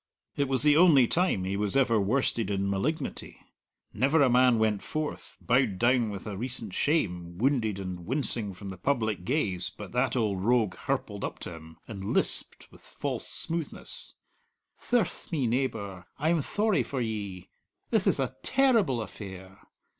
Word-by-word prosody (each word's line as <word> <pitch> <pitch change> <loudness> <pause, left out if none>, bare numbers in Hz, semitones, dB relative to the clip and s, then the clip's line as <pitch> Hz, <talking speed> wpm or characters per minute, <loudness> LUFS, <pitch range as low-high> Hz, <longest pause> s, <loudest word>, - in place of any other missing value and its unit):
It 140 - 0
was 135 0 +3
the 150 -1 +5
only 155 -6 +7
time 170 - +1
he 95 +1 -2
was 105 +4 0
ever 115 -5 +3
worsted 115 0 +1
in 100 -1 -1
malignity. 100 +12 -3 0.6
Never 140 +7 +3
a 130 - +4
man 125 -1 +5
went 110 -2 +1
forth, 155 0 -5
bowed 125 -6 +2
down 120 +1 +3
with 100 -2 -7
a 105 -2 -5
recent 115 -2 -3
shame, 90 - 0
wounded 115 -4 +1
and 90 -2 -6
wincing 120 -7 +1
from 100 +2 -8
the 95 -2 -8
public 110 -6 0
gaze, 95 - 0
but 105 -3 -10
that 125 +2 +1
old 105 -6 0
rogue 115 -4 +2
hirpled - - -3
up - - -4
to 90 - -6
him, 80 0 -12
and 100 -3 -4
lisped - - +1
with - - -17
false - - -5
smoothness: 165 -1 -5 0.6
"Thirce 240 -5 -1
me, 145 -6 0
neebour, 110 -7 -2
I'm 160 +2 +1
thorry 210 +6 +1
for 135 - -4
ye! 100 -6 -4 0.4
Thith - - +2
ith - - +2
a - - -2
terrible 225 - +2
affair! 95 -2 -10
115 Hz, 160 wpm, -28 LUFS, 100-140 Hz, 0.6 s, only